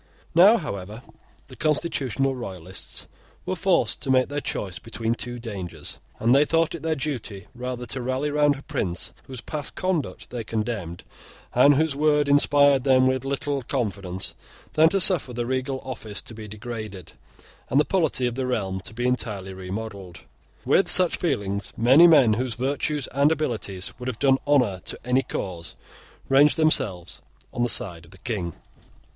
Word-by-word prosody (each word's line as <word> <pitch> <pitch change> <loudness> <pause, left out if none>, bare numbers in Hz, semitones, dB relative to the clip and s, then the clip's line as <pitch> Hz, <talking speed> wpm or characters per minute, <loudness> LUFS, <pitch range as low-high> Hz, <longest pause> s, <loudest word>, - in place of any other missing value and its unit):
Now, 195 +8 +7
however, 105 - -6 0.4
the - - -12
constitutional 135 -4 0
Royalists 95 -6 -7 0.4
were 185 +1 -2
forced 185 0 +1
to 135 - -4
make 130 -1 +3
their 145 0 -3
choice 95 -8 -4
between 115 -1 -3
two 120 +1 -5
dangers; 100 -7 -7 0.2
and 115 +2 +3
they 140 +2 +6
thought 165 +1 +1
it 170 - -6
their 160 0 0
duty 120 - -4
rather 125 0 -5
to 130 +2 -5
rally 130 +4 -1
round 145 -1 +3
a 135 - -11
prince 95 -9 -3
whose 130 -3 -8
past 150 +1 -6
conduct 185 -6 -2
they 120 -2 -4
condemned, 105 -6 -4 0.5
and 140 +4 +6
whose 155 0 +1
word 150 0 +2
inspired 145 -1 +4
them 130 -1 +4
with 130 0 +1
little 140 +1 -2
confidence, 100 -8 -3 0.4
than 160 +1 +5
to 195 - +1
suffer 175 -9 +6
the 120 0 -2
regal 130 +1 -2
office 115 -5 -6
to - - -9
be 110 -1 -9
degraded, 105 -3 -7 0.6
and 135 - +3
the 150 - +3
polity 160 -9 +1
of 120 - -1
the 130 +1 -3
realm 95 -6 -2
to 110 - -9
be 120 +1 -2
entirely 105 -6 -2
remodelled. 95 -1 -7 0.4
With - - +3
such - - +4
feelings, 100 0 -2
many 135 +9 +7
men 140 -9 +6
whose 120 +1 -2
virtues 140 +2 -1
and 140 +3 +3
abilities 110 - -2
would 125 - -6
have 125 -3 -3
done 135 +1 +3
honour 125 -10 +3
to - - -4
any 125 +1 +2
cause, 90 -9 -5 0.5
ranged 145 +4 +5
themselves 105 - 0 0.3
on 120 - -3
the 120 - +2
side 90 -10 -1
of - - -19
the 95 - -16
King. 95 -5 -4
125 Hz, 170 wpm, -24 LUFS, 105-145 Hz, 0.6 s, Now